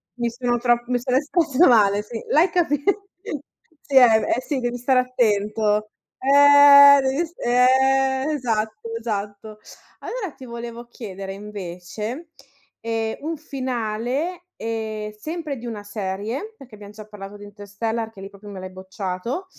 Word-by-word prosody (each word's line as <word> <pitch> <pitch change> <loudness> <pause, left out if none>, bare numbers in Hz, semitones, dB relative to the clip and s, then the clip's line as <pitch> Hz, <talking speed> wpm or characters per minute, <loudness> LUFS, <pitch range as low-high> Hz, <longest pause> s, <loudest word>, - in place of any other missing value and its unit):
mi 240 -1 -1
sono 240 0 -1
tro 240 0 +2
mi 250 - +1
sono 255 +1 0
espressa 310 +2 +3
male, 205 -4 +4
sì, 225 +1 -7
l'hai 325 +5 +4
capi 295 -5 0 1.0
sì, 280 - -6
eh, 260 - +9 0.3
eh 250 - -3
sì 275 0 -3
devi 240 0 -2
stare 255 +1 +2
attento. 215 -3 0 0.3
Eh 280 +1 +8
devi 270 +5 0
st 340 - -24
eh 265 +2 +3
esatto, 225 -4 -3
esatto. 210 -1 -5 0.4
Allora 435 -9 -5
ti 265 - -11
volevo 235 0 -8
chiedere 195 -5 -8
invece, 210 - -7 0.5
ehm, 225 -1 -2
un 320 +1 -4
finale, 260 +5 -3
ehm, 220 -1 -4
sempre 305 +6 -6
di 240 - -10
una 215 -3 -6
serie, 210 - -5
perché 255 -4 -15
abbiam 205 -1 -12
già 215 0 -11
parlato 205 -1 -10
di 205 - -12
Interstellar 210 +3 -4
che 195 -3 -13
lì 195 - -8
proprio 200 +1 -13
me 195 - -8
l'hai 185 0 -8
bocciato, 190 - -5
235 Hz, 145 wpm, -22 LUFS, 210-270 Hz, 1.0 s, eh